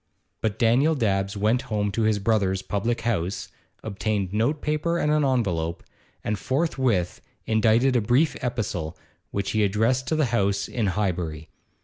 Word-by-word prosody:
But 110 -2 -1
Daniel 130 +7 +3
Dabbs 100 -5 0
went 110 +5 +2
home 105 -2 0
to 105 - -1
his 110 -1 +2
brother's 95 -3 +1
public 115 +4 -1
house, 100 -5 -2 0.3
obtained 100 -2 -2
note 120 +8 +1
paper 155 +3 0
and 150 -3 +1
an 150 0 +3
envelope, 95 -11 0 0.4
and 105 -1 -2
forthwith 130 - 0 0.2
indited 115 +4 +3
a 120 - +3
brief 125 +9 +2
epistle 105 -10 -3 0.3
which 100 -1 -2
he 110 -1 +2
addressed 115 +6 +1
to 160 - +1
the 155 -2 +2
house 100 -2 +1
in 115 -4 -1
Highbury. 90 -6 -2
110 Hz, 150 wpm, -25 LUFS, 100-125 Hz, 0.4 s, Daniel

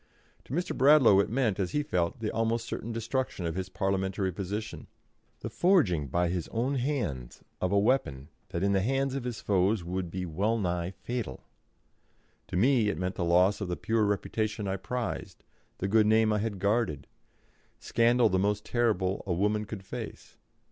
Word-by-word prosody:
To - - -8
Mr. 175 +4 -1
Bradlaugh 135 -7 +6
it 100 - +2
meant, 115 -4 0
as 95 -2 -1
he 150 - +1
felt, 90 - -1
the 110 - -1
almost 115 +1 0
certain 115 - -5
destruction 115 -3 -2
of 80 - -1
his 95 +1 -4
Parliamentary 95 0 -1
position, 100 +5 -5 0.5
the - - -4
forging 120 - +3
by 85 +6 +1
his 90 -2 -2
own 120 +5 -1
hands 120 - -3 0.2
of 90 - 0
a 100 - +3
weapon 100 - +1 0.2
that 85 - -3
in 100 - +2
the 95 -1 +2
hands 135 +5 0
of 135 -2 -4
his 120 -3 -4
foes 95 0 +1
would 90 +1 -3
be 90 +1 -4
well 100 +8 0
nigh 90 -4 -1
fatal. 110 - -5 1.0
To - - -3
me 120 0 +3
it 100 - -2
meant 90 +2 -2
the 90 - -3
loss 90 +5 +3
of 100 - -2
the 90 - -3
pure 110 -1 +1
reputation 105 +1 -1
I 95 0 -1
prized, 125 +5 -5 0.3
the 95 - -2
good 105 +1 +4
name 110 0 +4
I 105 - +1
had 105 -1 -2
guarded 100 - 0 0.7
scandal 120 +1 +3
the 95 - +1
most 105 +2 0
terrible 105 -6 0
a 90 - +1
woman 105 +4 0
could 100 -2 -8
face. - - -8
105 Hz, 185 wpm, -29 LUFS, 90-115 Hz, 1.0 s, Bradlaugh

